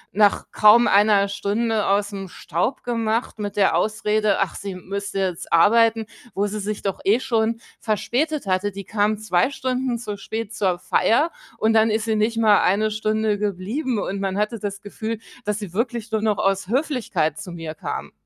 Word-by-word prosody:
nach 205 -1 +3
kaum 215 +3 +6
1 200 0 +4
Stunde 210 +2 -1
aus'm 200 -1 -1
Staub 175 - -3
gemacht 230 -1 -1
mit 205 0 -4
der 200 -2 +3
Ausrede, 215 -1 +1
ach, 195 - 0
sie 200 -2 -6
müsste 195 +2 -5
jetzt 180 -3 -3
arbeiten, 225 +5 +4 0.3
wo 200 - +1
sie 210 +1 -3
sich 210 +1 -4
doch 195 -2 -2
eh 215 +5 +3
schon 230 -3 0 0.2
verspätet 265 +7 -1
hatte. 190 +2 0
Die 200 0 -7
kam 210 +1 0
2 205 +1 +1
Stunden 255 -2 -2
zu 215 -3 -5
spät 220 +1 -5
zur 185 -5 0
Feier 290 - +2 0.3
und 220 +1 +2
dann 220 0 +4
ist 220 +1 0
sie 220 -1 0
nicht 215 +2 0
mal 215 -2 +5
1 215 +3 +2
Stunde 215 -1 0
geblieben 210 - -2
und 200 -1 -3
man 195 0 -2
hatte 210 +2 -1
das 200 0 -5
Gefühl, 220 +2 -4 0.3
dass 210 -1 -1
sie 205 -5 -7
wirklich 230 +1 -2
nur 220 -1 0
noch 215 -2 +1
aus 195 -1 0
Höflichkeit 235 - -1
zu 180 - -7
mir 170 -1 -8
kam. - - -5
210 Hz, 180 wpm, -22 LUFS, 200-225 Hz, 0.3 s, kaum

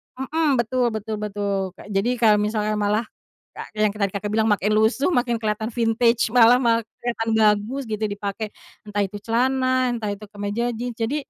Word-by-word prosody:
mhm, 310 +5 -1
betul 245 +2 +1
betul 215 0 -4
betul, 200 -2 -3
Kak, - - -13
jadi 195 +5 +1
kalau 215 -3 +4
misalnya 210 0 0
malah 210 +2 +1 0.5
ka - - -8
kayak 215 - -2
yang - - -13
tadi, 200 -2 +1
Kakak, 205 +1 -3
bilang 220 0 +2
makin 205 0 +1
lusuh 220 +10 +2
makin 240 -5 +1
kelihatan 220 -1 -2
vintage, 230 0 +2
malah 240 0 +7
ma 235 -2 +3 0.2
kelihatan 230 -2 -2
bagus 215 +5 +2
gitu 215 0 -2
dipakai, 205 +1 -4 0.4
entah 205 0 0
itu 200 +1 -5
celana, 255 +3 +1
entah 225 -3 -3
itu 210 - -14
kemeja 205 +3 -3
jeans, 240 +1 -5
jadi 230 +5 -2
220 Hz, 180 wpm, -23 LUFS, 210-240 Hz, 0.5 s, malah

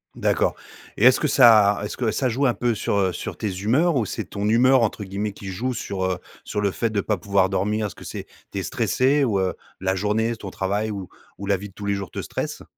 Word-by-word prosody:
D'accord - - +1 0.4
et 115 - +3
est-ce 130 - +7
que 150 - +1
ça 110 -7 +6
est-ce 105 - -4
que 115 -4 0
ça 130 - 0
joue 135 +5 0
un 120 - +2
peu 120 -1 +1
sur, 105 - -1
heu, 95 -2 +1
sur - - -6
tes 105 - -2
humeurs 140 - +2
ou 115 - +1
c'est 110 +1 -4
«ton 100 +2 -3
humeur» 130 +3 +5
entre 105 -1 -1
guillemets, 100 +2 -3
qui 100 - -10
joue 120 +7 -2
sur, 95 -5 -3
heu, 90 -1 0 0.3
sur 105 - -3
le 100 -2 +1
fait 115 +3 -1
de 105 -2 0
pas 105 0 -1
pouvoir 95 0 +2
dormir? 105 +3 0
Est-ce - - -10
que - - -12
c'est - - -6 0.3
tu - - -6
es - - -3
stressé 140 +3 +1
ou, 105 -6 +1
heu, 95 -1 0 0.3
la 95 0 0
journée, 105 +4 0
s 115 - -3
ton 100 - -6
travail 100 +4 -1
ou 95 -4 -5 0.3
ou 100 - -6
la 100 -1 +2
vie 100 +1 -8
de - - -21
tous 100 - -8
les 100 - +1
jours 100 -2 -4
te - - -5
stresse? - - -5
105 Hz, 265 wpm, -23 LUFS, 100-115 Hz, 0.4 s, est-ce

